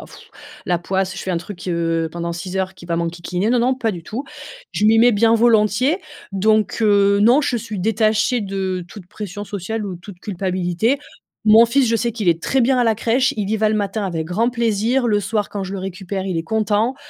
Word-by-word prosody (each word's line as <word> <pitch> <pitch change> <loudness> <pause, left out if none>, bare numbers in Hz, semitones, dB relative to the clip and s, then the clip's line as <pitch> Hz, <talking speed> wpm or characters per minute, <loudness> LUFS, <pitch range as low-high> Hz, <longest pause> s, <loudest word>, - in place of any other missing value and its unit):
pfff, - - -16 0.3
la 175 -1 0
poisse. 190 +1 -2
Je - - -5
fais 190 - -3
un 175 - 0
truc, 180 +1 -7
heu, 165 -1 0
pendant 170 0 -4
6 180 +2 -6
heures 190 0 -2
qui 170 - -13
va 170 -1 -1
m'enquiquiner». 175 +4 -2
Non, 245 - +3
non, 250 +2 +2
pas 235 -4 -1
du 170 -2 -7
tout. 240 - -5 0.5
Je 210 - -1
m'y 225 +1 +5
mets 240 +1 +6
bien 225 +2 +4
volontiers 230 - +3 0.3
donc, 215 +2 +1
heu, 200 -2 +4
non. 240 +7 +5
Je 245 - 0
suis 215 -3 -5
détachée 220 +4 +1
de 190 -2 -3
toute 185 -1 -11
pression 205 +1 -7
sociale 210 +2 -4
ou 185 -3 -5
toute 180 0 -12
culpabilité. 185 +5 -1 0.5
Mon 220 +2 +8
fils, 250 +2 +2
je 230 - +1
sais 235 +1 0
qu'il 215 -5 -2
est 165 0 +2
très 265 - +1
bien 260 +2 +3
à 250 - +3
la 225 -3 +2
crèche. 245 +4 +1
Il 205 -2 -2
y 220 - +1
va 215 0 +2
le 215 - +1
matin 205 0 -2
avec 165 -4 -3
grand 220 +8 0
plaisir, 235 +1 +1
le 210 -2 +2
soir 210 0 -1
quand 200 -1 -5
je 190 +1 -5
le - - -4
récupère, 190 0 -5
il 185 -3 -2
est 165 - -1
content. 220 +5 0
205 Hz, 230 wpm, -20 LUFS, 185-225 Hz, 0.5 s, Mon